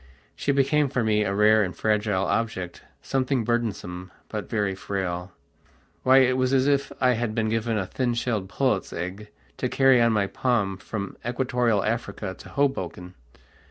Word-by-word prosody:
She 145 - 0
became 140 +1 +2
for 125 -3 0
me 105 -1 +2
a 100 -1 -1
rare 110 +1 +5
and 95 -3 -2
fragile 105 -3 +1
object, 95 -7 -2 0.2
something 130 -2 0
burdensome, 100 -6 -2 0.2
but - - -5
very 105 -3 0
frail. 95 -2 -4 0.7
Why 130 +1 +5
it 130 0 +3
was 130 +1 +1
as 130 0 +3
if 140 -1 +1
I 130 -1 +4
had 115 -2 -1
been 110 -1 +1
given 115 0 0
a 95 - -1
thin 120 +4 -1
shelled 110 -5 -2
pullet's 105 -2 0
egg 90 +5 -5 0.3
to - - -1
carry 135 -2 +5
on 115 0 +4
my 105 -2 +2
palm 100 -3 0
from 100 -1 -6
Equatorial 120 -3 +1
Africa 105 -3 -3
to - - -11
Hoboken. 95 -10 -2
110 Hz, 165 wpm, -25 LUFS, 100-125 Hz, 0.7 s, rare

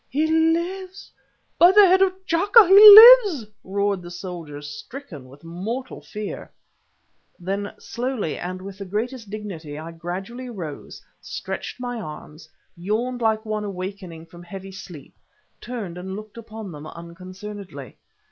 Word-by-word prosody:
"He 300 +4 0
lives! 340 +4 -1 0.5
by 350 +2 +7
the 410 +1 +7
head 375 +1 +4
of 385 -1 +4
T'Chaka 390 +5 +5
he 380 - +4 0.6
lives!" 280 - -6 0.2
roared 200 0 -2
the 175 - -10
soldiers, 170 -5 -8
stricken 145 - -10
with 140 +3 -17
mortal 200 +10 -6
fear. 210 -1 -8 0.9
Then 195 +3 -4
slowly 235 - -4
and 185 +1 -7
with 195 0 -10
the 200 - -6
greatest 220 +3 -5
dignity 185 -8 -8
I 160 +2 -8
gradually 190 +9 -7
arose, 175 -11 -9 0.2
stretched - - -7
my 245 -2 -5
arms, 155 -1 -11 0.3
yawned 225 +8 -3
like 220 -1 0
one 215 -1 -3
awaking 185 -4 -7
from 170 +1 -15
heavy 195 +2 -10
sleep, 180 -6 -12 0.5
turned 205 -8 -7
and 190 +1 -7
looked 215 0 -10
upon 220 -3 -9
them 150 -1 -10
unconcernedly. 185 - -10
200 Hz, 140 wpm, -22 LUFS, 175-245 Hz, 0.9 s, by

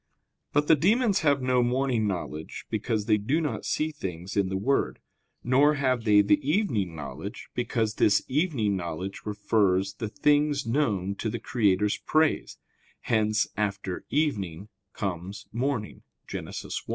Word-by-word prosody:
But 145 +1 +2
the 160 - +7
demons 205 - +3
have 140 -4 +2
no 125 -1 +3
morning 120 -2 +1
knowledge, 85 -5 -5
because 110 -1 -1
they 105 -1 +4
do 130 +10 0
not 145 -9 -3
see 155 +1 0
things 95 - -6
in 100 -2 +2
the 95 - -1
Word; 135 +8 0 0.5
nor 140 +5 +4
have 130 -4 0
they 105 -1 +6
the 150 +9 +3
evening 135 - 0
knowledge, 75 - -7
because 115 -3 -1
this 105 - +3
evening 130 - +1
knowledge 90 +2 -4
refers 100 -2 +1
the 110 +2 -5
things 145 +1 +2
known 110 -7 0
to 110 - -2
the 120 - -3
Creator's 105 -3 +1
praise 155 0 +1 0.4
(hence, 110 -1 +2
after 100 -3 -2
"evening" 105 - -1 0.2
comes 95 0 -4
"morning" 120 -2 -2 0.2
[Gen. - - -5
1]). - - -7
110 Hz, 145 wpm, -27 LUFS, 100-140 Hz, 0.5 s, the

